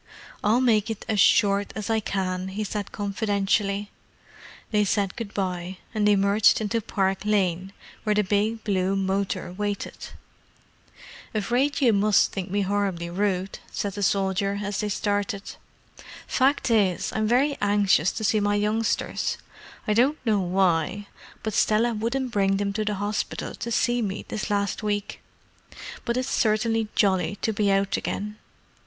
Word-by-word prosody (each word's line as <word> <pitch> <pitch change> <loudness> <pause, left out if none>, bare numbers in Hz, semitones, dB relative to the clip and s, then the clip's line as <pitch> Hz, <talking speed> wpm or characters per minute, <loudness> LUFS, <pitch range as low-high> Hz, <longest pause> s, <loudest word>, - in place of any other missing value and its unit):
"I'll 220 +4 +3
make 225 -4 +3
it 220 -2 -5
as 215 -2 0
short 200 0 +4
as 215 -2 -4
I 220 - +2
can," 185 -3 -2
he 200 +3 -3
said 205 0 -4
confidentially. 205 0 -1 0.8
They 210 -1 +3
said 200 -1 0
good 225 -4 -6
bye, 185 -2 -3 0.2
and 210 -2 +2
emerged 200 +1 +4
into 225 +1 -1
Park 195 -2 0
Lane, 190 -3 0 0.3
where 210 -1 +1
the 210 - +3
big 210 +3 0
blue 190 -2 0
motor 195 -2 -1
waited. 205 +1 -4 1.3
"Afraid 245 +8 +1
you 240 -4 +5
must 205 0 +3
think 190 -1 -4
me 205 +2 0
horribly 195 -4 -1
rude," 190 0 -1
said 200 -1 -3
the 205 - -5
soldier, 195 0 +1
as 200 0 -3
they 210 - -1
started. 205 -1 -1 0.8
"Fact 265 -1 +1
is, 200 -6 +2
I'm 215 0 0
very 270 +5 +3
anxious 200 -4 +3
to - - -5
see 215 +1 +3
my 205 0 +1
youngsters: 215 +2 0 0.5
I 210 - +3
don't 260 +7 +3
know 215 -3 +3
why, 185 +1 +1 0.4
but 220 - -2
Stella 225 +4 +2
wouldn't 235 +4 -2
bring 195 -2 +2
them 200 0 -1
to 215 +1 -1
the 210 -1 -1
hospital 205 +1 -3
to 235 - -5
see 240 +1 +1
me 205 -2 -3
this 215 - -3
last 200 0 0
week. 205 -1 -3 0.8
But 235 0 0
it's 255 +1 -1
certainly 225 -1 +1
jolly 195 0 +2
to 220 - +1
be 205 -1 +1
out 195 0 +1
again." 210 +1 -4
205 Hz, 155 wpm, -25 LUFS, 195-215 Hz, 1.3 s, you